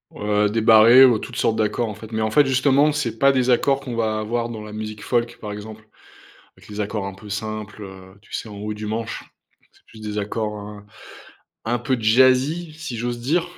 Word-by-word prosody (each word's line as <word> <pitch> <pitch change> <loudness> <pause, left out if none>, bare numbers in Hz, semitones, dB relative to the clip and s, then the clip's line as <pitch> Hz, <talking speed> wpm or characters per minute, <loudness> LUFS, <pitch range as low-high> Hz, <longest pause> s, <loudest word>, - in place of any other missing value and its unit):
Heu, 105 0 +1
des 110 +1 -1
barrés 115 +4 +8
ou 120 -4 +3
toutes 125 - -8
sortes 110 - +1
d'accords, 110 +2 0
en - - -5
fait. 110 +2 -12
Mais 110 - -2
en 110 - -1
fait, 145 +3 +5 0.5
c'est 120 -7 -3
pas 140 0 +5
des 130 -1 +1
accords 135 +3 +2
qu'on 130 -4 -6
va 110 -2 0
avoir 115 +2 -2
dans 110 -2 -7
la 105 - -9
musique 110 -1 -6
folk, 120 -1 -1
par 105 - -6
exemple, 110 +1 -9 0.7
avec - - -19
les 105 0 -5
accords 105 -1 -3
un 95 - -6
peu 105 +2 -13
simples, 105 0 -5
heu, 95 0 -12
tu - - -21
sais, - - -4
en 105 - -10
haut 105 +1 -4
du 105 0 -7
manche? 110 +1 -4 0.5
C'est - - -28
plus 110 - -15
des 105 -1 -5
accords, 105 +1 -3
hein, 105 0 -10 0.8
un 120 +2 0
peu 125 +2 -1
jazzy 130 +9 +3
si 155 -6 -6
j'ose 120 +1 -3
dire, 165 +8 0
110 Hz, 215 wpm, -22 LUFS, 105-120 Hz, 0.8 s, barrés